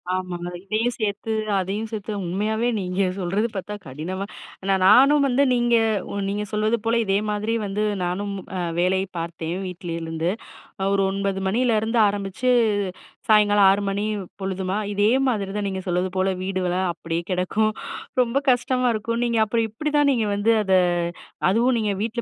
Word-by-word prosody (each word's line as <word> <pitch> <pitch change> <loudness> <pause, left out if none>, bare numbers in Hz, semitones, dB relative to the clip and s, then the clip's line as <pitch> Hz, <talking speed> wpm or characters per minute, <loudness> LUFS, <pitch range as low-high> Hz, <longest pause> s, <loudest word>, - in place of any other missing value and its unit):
ஆமா. 185 -1 -3 0.3
இதையும் 220 +4 0
சேர்த்து, 210 +1 -2 0.3
அதையும் 205 +4 -3
சேர்த்து 215 0 -4
உண்மையாவே 215 +6 0
நீங்க 185 0 -2 0.2
சொல்றது 195 +5 0
பார்த்தா 200 +2 -4
கடினமா 175 +9 -4 0.4
நான் 190 -1 +2
நானும் 275 +6 +6
வந்து, 265 +2 +3
நீங்க 240 -1 +3 0.5
நீங்க 205 +1 -2
சொல்வது 215 +2 +1
போல, 230 +1 +2
இதே 195 0 +2
மாதிரி 210 +2 -1
வந்து, 205 +1 -1 0.2
நானும் 200 +3 -2 0.5
வேலை 185 +2 +2 0.2
பார்த்தேன் 165 0 -4
வீட்டிலிருந்து. 165 -2 -3 0.6
ஒரு 200 - +2
9 195 0 -1
மணியிலருந்து 225 +1 +1
ஆரம்பிச்சு 200 +4 -2 0.8
சாயங்காலம் 205 -2 +5
6 200 +1 +3
மணி 200 +1 -1 0.4
பொழுதுமா, 190 +1 -2 0.2
இதே 205 +1 +3 0.2
மாதிரி 205 -6 0
தான். 205 -1 -1
நீங்க 190 -1 -3
சொல்வது 180 +1 0
போல 190 +1 +2
வீடு 185 0 -2
வேல 180 0 0 0.2
அப்படியே 165 0 -3
கெடக்கும். 195 +4 +1 0.5
ரொம்ப 245 +2 0
கஷ்டமா 250 0 +1
இருக்கும். 230 +2 -2
நீங்க 235 -1 +1
அப்புறம் 225 +1 0
எப்படிதான்? 295 +4 +1
நீங்க 225 -5 +1
வந்து, 215 +3 +3
அத 190 - +1 0.8
அதுவும் 235 +5 +3
நீங்க 210 -2 0
வீட்ல 235 +1 -2
205 Hz, 145 wpm, -23 LUFS, 185-225 Hz, 0.8 s, நானும்